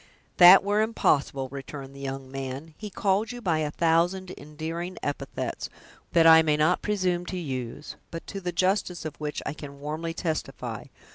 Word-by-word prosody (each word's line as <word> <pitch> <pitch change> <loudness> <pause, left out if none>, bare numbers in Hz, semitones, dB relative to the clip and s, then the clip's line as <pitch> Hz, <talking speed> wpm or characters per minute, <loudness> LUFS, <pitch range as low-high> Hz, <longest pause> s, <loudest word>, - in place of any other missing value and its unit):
"That 180 +2 +10
were 205 +1 +2
impossible," 140 -11 +1
returned 135 0 -8
the - - -10
young 135 -1 -6
man; 135 +3 -6
"he 210 - -6
called 200 +3 0
you 245 - -7
by 170 -8 0
a 150 -1 -1
thousand 175 +4 +1
endearing 165 +4 -6
epithets, 145 - -4 0.4
that 165 -1 +5
I 160 0 +9
may 155 -2 +2
not 155 +4 +2
presume 185 -4 0
to 185 - -4
use, 135 -3 -5
but 165 - -7
to 195 - -6
the 180 -1 -2
justice 185 -1 0
of 155 -2 -5
which, 150 -1 -4
I - - -2
can 140 -2 -10
warmly 155 +3 -4
testify. 160 -3 -4
160 Hz, 170 wpm, -27 LUFS, 145-185 Hz, 0.4 s, That